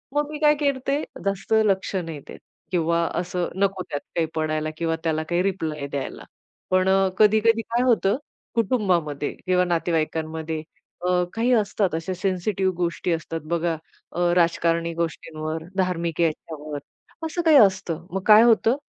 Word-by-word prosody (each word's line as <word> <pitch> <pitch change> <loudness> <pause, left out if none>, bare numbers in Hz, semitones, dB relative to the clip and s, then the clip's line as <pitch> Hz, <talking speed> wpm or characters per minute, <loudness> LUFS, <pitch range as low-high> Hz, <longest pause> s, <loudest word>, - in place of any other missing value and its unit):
मग 295 0 +1
मी 305 - -4
काय 300 -1 +5
करते 275 0 0 0.3
जास्त 195 +2 -1
लक्ष 195 -1 0
नाही 165 -5 -3
देत - - -10 0.3
किंवा 170 -1 +1 0.2
असं 180 0 -2
नको 195 -1 0
त्यात 145 - -3
काही 165 -2 +2
पडायला 155 0 -1
किंवा 165 0 0
त्याला 155 -1 0
काही 175 0 +2
रिप्लाय 160 -7 -2
द्यायला. 140 -1 -5 0.5
पण 185 0 +3
अ, 195 0 +4
कधी-कधी 220 +2 +4
काय 235 +2 -1
होतं 220 -3 +3 0.4
कुटुंबामध्ये 185 - 0
किंवा 180 0 +3
नातेवाईकांमध्ये 160 -2 -1 0.4
अ, 180 0 +3
काही 235 +3 +1
असतात 205 -5 +1
अशा 165 +3 -3
सेन्सिटिव्ह 190 +1 0
गोष्टी 175 0 -1
असतात 165 0 -4
बघा 170 0 0 0.4
अ, 175 - -5 0.2
राजकारणी 170 -1 +2
गोष्टींवर, 160 -1 -4
धार्मिक 170 -3 0
याच्यावर 155 -2 -2 0.5
असं 320 +2 -2
काही 320 -3 +6
असतं. 185 - +3
मग 195 - -1
काय 215 0 +9
होतं? 230 +1 +4
180 Hz, 145 wpm, -24 LUFS, 165-200 Hz, 0.5 s, काय